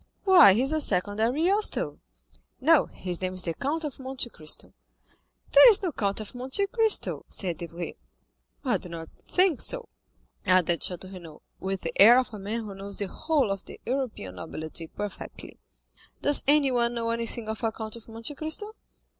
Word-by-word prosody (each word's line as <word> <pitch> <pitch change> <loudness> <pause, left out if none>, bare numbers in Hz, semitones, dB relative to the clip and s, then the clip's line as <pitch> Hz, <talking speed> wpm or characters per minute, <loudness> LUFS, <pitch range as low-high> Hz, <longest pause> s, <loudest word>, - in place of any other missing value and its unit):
"Why, 365 - +8
he 230 +6 +2
is 270 - -1
a 310 0 +1
second 205 -3 -1
Ariosto." 335 - +1 0.6
"No, 315 +3 +4
his 180 -2 -4
name 185 0 -3
is 185 - 0
the 165 - -2
Count 305 - -2
of 295 -3 -6
Monte 260 -2 -3
Cristo." 155 -1 -5 0.8
"There - - +9
is 420 -2 +7
no 360 - 0
Count 200 -6 -1
of 215 -2 -7
Monte 260 +10 -1
Cristo" 445 +1 +2
said 175 -5 -3
Debray. 170 0 -6 0.7
"I 245 -6 +2
do 180 - -10
not 165 -1 -8
think 365 -6 +1
so," - - 0 0.5
added 180 -3 +3
Château 185 +1 -4
Renaud, 165 -4 -12 0.2
with 190 0 -3
the - - -4
air 235 +5 +9
of 255 -3 0
a 210 - -7
man 210 +4 -3
who 205 -2 -7
knows 195 +1 -8
the 200 -2 -2
whole 295 - 0
of 195 -1 -4
the - - -11
European 240 - -4
nobility 160 - -5
perfectly. 205 +4 -8 0.6
"Does 290 0 +5
anyone 255 -5 +3
know 230 -1 -1
anything 230 0 -3
of 220 +1 -5
a 225 - +1
Count 220 0 -6
of 230 - -12
Monte 225 +5 -4
Cristo?" 315 +9 -4
230 Hz, 180 wpm, -27 LUFS, 190-290 Hz, 0.8 s, There